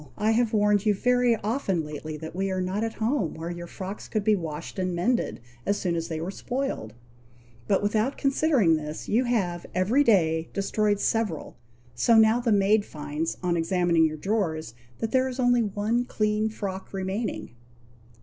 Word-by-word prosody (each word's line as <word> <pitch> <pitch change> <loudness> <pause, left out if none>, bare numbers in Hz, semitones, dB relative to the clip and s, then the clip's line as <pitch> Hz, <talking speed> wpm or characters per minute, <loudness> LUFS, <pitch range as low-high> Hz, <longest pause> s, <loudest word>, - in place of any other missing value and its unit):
I 215 +1 +2
have 230 0 +2
warned 210 -1 +2
you 210 - +4
very 245 +2 +3
often 200 - -1
lately 150 +1 -6
that 160 +1 -8
we 195 +1 -1
are 185 0 -1
not 185 +4 -1
at 225 0 -3
home, 220 - 0
where 165 +2 -5
your 175 0 -7
frocks 195 +3 -7
could 215 -2 -1
be 215 0 +4
washed 165 0 -6
and 185 -1 -1
mended 235 +8 0 0.2
as 200 0 0
soon 175 -2 -1
as 165 0 -2
they 160 -2 -4
were 170 +4 -3
spoiled; 245 - -4 0.7
but 195 0 +2
without 215 +6 +1
considering 275 - +3
this 150 0 -6
you 240 +5 +2
have, 185 -8 -1
every 215 +10 +3
day, 160 - +2
destroyed 205 +1 +1
several, 210 -10 -1 0.4
so 230 - +3
now 220 +2 +5
the 240 -2 0
maid 205 +1 +4
finds, 150 -1 -4
on 175 -1 +1
examining 170 -1 +2
your 155 0 -5
drawers, 160 - -1 0.2
that 225 - -3
there 260 0 +2
is 255 0 -7
only 245 -1 +4
one 215 +3 0
clean 215 -1 0
frock 195 -3 -6
remaining!" 195 +4 -3
200 Hz, 180 wpm, -26 LUFS, 170-225 Hz, 0.7 s, now